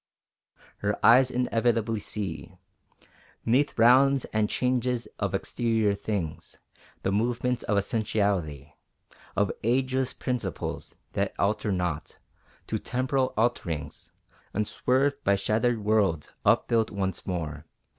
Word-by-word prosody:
Her 105 0 -1
eyes 125 +3 +7
inevitably 115 -3 +1
see, 95 -8 -5 0.9
'Neath 130 +6 +2
rounds 130 +4 +5
and 110 -1 +2
changes 125 -1 0
of - - -1
exterior 115 -3 +1
things, 85 -6 -4 0.5
The 95 - +1
movements 120 +3 0
of 105 - 0
Essentiality 100 - -1 0.6
Of 100 0 +2
ageless 130 +2 +1
principles 115 -9 -4 0.2
that - - -1
alter 105 +1 0
not 90 -5 -2 0.5
To - - -2
temporal 130 +1 -1
alterings 85 -10 -2 0.5
Unswerved 130 +6 +1
by 100 - +3
shattered 110 +3 0
worlds 100 -8 +1
upbuilt 115 -2 +3
once 95 -2 -3
more. 80 -5 -4
110 Hz, 105 wpm, -27 LUFS, 100-125 Hz, 0.9 s, eyes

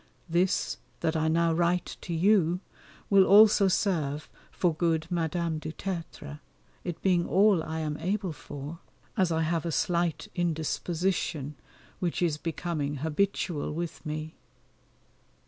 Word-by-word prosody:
This, 175 +2 +1 0.2
that 160 0 0
I 160 0 +1
now 165 +1 +3
write 175 +2 +2 0.2
to - - -7
you, 175 0 +3 0.5
will 195 -1 +7
also 210 0 +7
serve 160 -7 0 0.2
for 175 -3 +1
good 160 -1 +1
Madame 165 -1 -1
du 155 0 -5
Tertre, 165 -5 -6 0.4
it 175 -2 -4
being 180 -3 +3
all 195 -3 +4
I 160 0 -4
am 150 -1 -2
able 190 0 -2
for, 145 +2 -8 0.4
as 185 -6 +2
I 160 0 +1
have 165 0 0
a 170 - -2
slight 170 -2 0
indisposition 165 -2 -1 0.5
which 175 0 -1
is 160 -4 +1
becoming 160 -3 -3
habitual 165 -1 0
with 170 0 -4
me. 155 0 -4
170 Hz, 130 wpm, -28 LUFS, 155-180 Hz, 0.5 s, will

